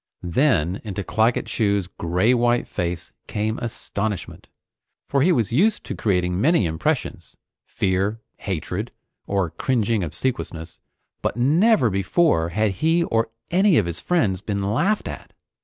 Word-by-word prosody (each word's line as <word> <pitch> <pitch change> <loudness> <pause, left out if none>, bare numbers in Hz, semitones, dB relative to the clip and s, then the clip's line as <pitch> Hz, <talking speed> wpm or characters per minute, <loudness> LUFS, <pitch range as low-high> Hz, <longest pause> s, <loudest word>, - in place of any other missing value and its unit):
Then 90 - +1
into 100 -2 -4
Claggett 110 +5 +1
Chew's 100 -3 0
gray 90 +6 +1
white 120 0 +2
face 85 -1 -3 0.2
came 110 +1 -2
astonishment, 110 -3 -4 0.6
for 140 - +1
he 175 +6 +4
was 120 - +1
used 205 - +2
to - - -5
creating 90 -3 0
many 155 - +3
impressions 80 -1 -2 0.3
fear, 95 +3 0 0.2
hatred, 95 +4 -4 0.4
or 95 -5 0
cringing 110 +2 0
obsequiousness 85 - -4 0.4
but - - -2
never 150 - +4
before 95 - +2
had 105 +3 +1
he 165 +2 +3
or 115 -7 0 0.2
any 185 -1 +4
of 105 - +3
his 85 0 -4
friends 105 - +1
been 100 -1 -2
laughed 200 - +1
at. - - -8
105 Hz, 135 wpm, -23 LUFS, 95-130 Hz, 0.6 s, he